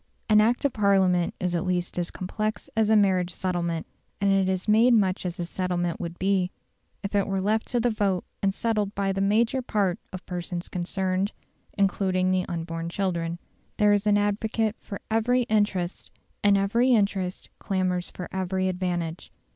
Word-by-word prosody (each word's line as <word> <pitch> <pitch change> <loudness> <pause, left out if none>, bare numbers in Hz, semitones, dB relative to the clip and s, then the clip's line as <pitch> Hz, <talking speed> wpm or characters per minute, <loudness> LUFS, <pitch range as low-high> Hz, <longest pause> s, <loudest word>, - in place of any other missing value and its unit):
An 215 -1 +6
Act 240 +6 +2
of 280 - +2
Parliament 190 -4 +3
is 180 -1 -1
at 170 - 0
least 180 -1 -1
as 175 - -1
complex 215 +3 -4
as 220 -1 +2
a 220 - +5
marriage 190 -4 +3
settlement; 170 -3 -2 0.3
and 200 0 +2
it 195 -1 +3
is 185 +1 -1
made 230 +3 +5
much 190 -3 +1
as 175 0 -6
a 175 - -1
settlement 175 -1 -2
would 170 0 -5
be 190 -1 +1 0.5
if 200 - -4
it 200 -1 +2
were 195 -1 0
left 215 +3 0
to 245 - 0
the 240 +1 +2
vote 200 -4 0 0.2
and 195 - +2
settled 210 -1 -1
by 195 -1 0
the 195 0 -1
major 225 +6 +2
part 205 -5 0
of 185 -1 -8
persons 175 -1 -5
concerned, 185 +2 -1 0.4
including 190 -2 +2
the 185 -1 +1
unborn 165 0 -4
children. 170 -3 -2 0.4
There 210 -1 +5
is 205 +1 +1
an 205 0 +5
advocate 215 +2 0
for 200 - -7
every 245 +3 +2
interest, 205 -5 0 0.3
and 200 -1 +5
every 235 +6 +3
interest 195 -4 0
clamours 185 -2 -1
for 180 - -7
every 190 0 0
advantage. 175 -3 -3
195 Hz, 175 wpm, -26 LUFS, 180-210 Hz, 0.5 s, An